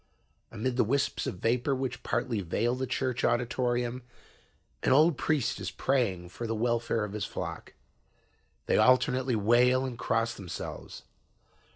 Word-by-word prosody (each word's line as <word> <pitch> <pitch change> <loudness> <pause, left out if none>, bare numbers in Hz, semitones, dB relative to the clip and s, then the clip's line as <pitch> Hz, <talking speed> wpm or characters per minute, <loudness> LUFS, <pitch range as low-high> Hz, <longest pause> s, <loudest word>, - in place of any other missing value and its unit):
"Amid 120 +3 -2
the - - +5
whisps 140 +6 0
of - - -3
vapor 120 +8 0
which 130 -2 -3
partly 115 -5 -1
veil 105 +7 0
the 130 +1 -3
church 125 -1 -1
auditorium, 120 0 0 0.8
an - - +1
old 155 +3 +5
priest 145 -3 0
is 95 -2 -3
praying 95 -9 0
for 115 +6 -6
the 115 - -1
welfare 115 -1 0
of 105 -1 -5
his 105 -1 -2
flock. - - -6 0.9
They - - +2
alternately 130 0 +3
wail 120 +5 +3
and 125 -2 -6
cross 115 +1 0
themselves. 90 -5 -7
120 Hz, 145 wpm, -29 LUFS, 110-130 Hz, 0.9 s, the